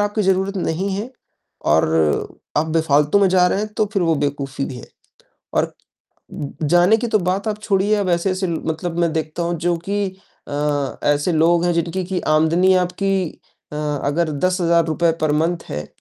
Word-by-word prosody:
आपकी 205 +1 0
ज़रूरत 190 +1 +1
नहीं 180 +2 -1
है 215 +6 -4 0.5
और 80 -1 +1 0.2
आप 155 - +2
बेफ़ालतू 155 +1 +2
में 195 -1 +4
जा 180 -1 +4
रहे 185 - 0
हैं, 210 - -1
तो 215 -1 +1
फ़िर 195 - +1
वो 165 -2 +2
बेवकूफी 140 -1 -2
भी 130 - -6
है - - -10 0.7
और - - 0 0.6
उ 145 - -5 0.2
जाने 175 +7 +4
की 235 +1 -2
तो 220 - +3
बात 185 +3 -1
आप 210 -1 -1
छोड़िए 205 0 +2
अब 200 -3 -1
ऐसे-ऐसे 185 +2 0
ल 170 - -1
मतलब 165 +1 -3
मैं 170 -1 +2
देखता 160 +1 -2
हूँ, 170 0 -1
जो 175 +2 0
कि 205 -1 0 0.4
अ, 145 -1 -1
ऐसे 145 +4 +2
लोग 170 +2 +3
हैं 175 - +2
जिनकी 170 +2 -1
कि 185 0 -2
आमदनी 165 +5 +4
आपकी 185 +1 0 0.4
अ, - - -6 0.3
अगर 155 +3 0
₹10,000 170 -2 +2
पर 155 -1 +2
मंथ 165 +3 0
है 75 +1 -5
170 Hz, 180 wpm, -20 LUFS, 155-190 Hz, 0.7 s, में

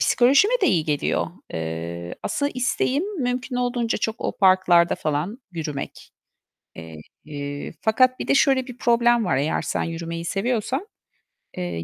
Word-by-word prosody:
Psikolojime 275 - +4
de - - +5
iyi 160 -4 +2
geliyor. 150 -2 0 0.3
Eee, 85 +2 -5
aslında 285 0 -1
isteğim 255 +5 0 0.2
mümkün 250 +1 -2
olduğunca 245 -2 0
çok 220 +2 -2
o - - -3
parklarda 185 -3 +5
falan 155 - -2
yürümek. 150 -4 -6 1.2
Eee, 145 -1 -6
fakat 255 +3 +3
bir - - -4
de - - +4
şöyle 270 -2 +3
bir 250 -1 -10
problem 240 -1 +3
var; 180 - +1
eğer 145 +4 0
sen - - -2
yürümeyi 165 0 -5
seviyorsan, 240 - -1 0.7
eee, 175 - -3
210 Hz, 135 wpm, -23 LUFS, 155-250 Hz, 1.2 s, de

